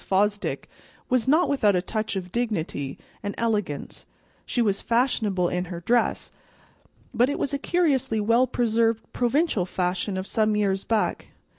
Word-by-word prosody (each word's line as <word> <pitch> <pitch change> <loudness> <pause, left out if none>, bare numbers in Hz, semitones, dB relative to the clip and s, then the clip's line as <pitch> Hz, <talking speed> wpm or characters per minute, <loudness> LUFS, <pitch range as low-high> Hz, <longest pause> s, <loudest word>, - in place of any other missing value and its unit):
Fosdick 205 +2 0 0.4
was 250 -1 +2
not 315 +6 +4
without 215 -8 +3
a 180 - +2
touch 215 +1 -3
of 180 -2 -4
dignity 170 - -2 0.2
and 205 - -4
elegance; 210 -10 -2 0.4
she - - -2
was 205 -4 +1
fashionable 225 -7 +1
in 180 +1 -2
her 175 -1 -6
dress, 240 +7 +1 0.8
but 245 +2 +3
it 285 - -1
was 280 - -2
a 280 - 0
curiously 280 -9 +1
well 230 +4 +3
preserved 230 -2 +1
provincial 250 - +1
fashion 185 +2 -1
of 185 - -3
some 215 +1 +1
years 195 -2 +1
back. 225 -2 -1
215 Hz, 150 wpm, -25 LUFS, 190-245 Hz, 0.8 s, not